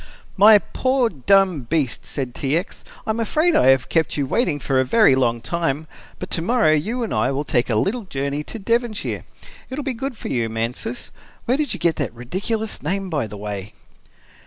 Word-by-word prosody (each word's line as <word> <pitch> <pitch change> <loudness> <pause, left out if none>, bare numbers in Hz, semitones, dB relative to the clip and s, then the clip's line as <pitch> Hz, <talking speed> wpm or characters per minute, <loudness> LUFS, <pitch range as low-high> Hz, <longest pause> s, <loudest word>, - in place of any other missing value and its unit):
"My 210 +2 +8
poor, 255 +3 0
dumb 185 +2 +3
beast," 150 -7 -1
said 130 -4 -4
T. 140 +5 0
X. 180 - -5 0.2
"I - - 0
am 220 - -3
afraid 310 +10 +2
I 125 - +4
have 135 -2 +4
kept 160 -2 +1
you 145 - +1
waiting 155 - 0
for 135 -1 0
a - - +4
very 215 - +5
long 120 -3 +1
time, 160 +2 -2 0.3
but - - -7
tomorrow 190 +1 +2
you 215 +11 0
and 225 - -3
I - - +1
will 140 +2 -1
take 125 -4 0
a 115 - +1
little 205 - 0
journey 140 -2 -3
to - - -7
Devonshire. 230 +1 -1 0.4
It 260 - -5
will 295 - -3
be 270 -2 -2
good 255 +1 -5
for - - -6
you, 115 -3 0
Mansus 120 - -4 0.3
where 245 - +2
did 295 -5 -1
you - - -8
get 170 -2 +1
that 130 -6 -2
ridiculous 200 - -3
name, 195 -1 -2
by 145 -8 -1
the 105 0 -9
way!" 100 0 -6
165 Hz, 205 wpm, -21 LUFS, -, 0.4 s, My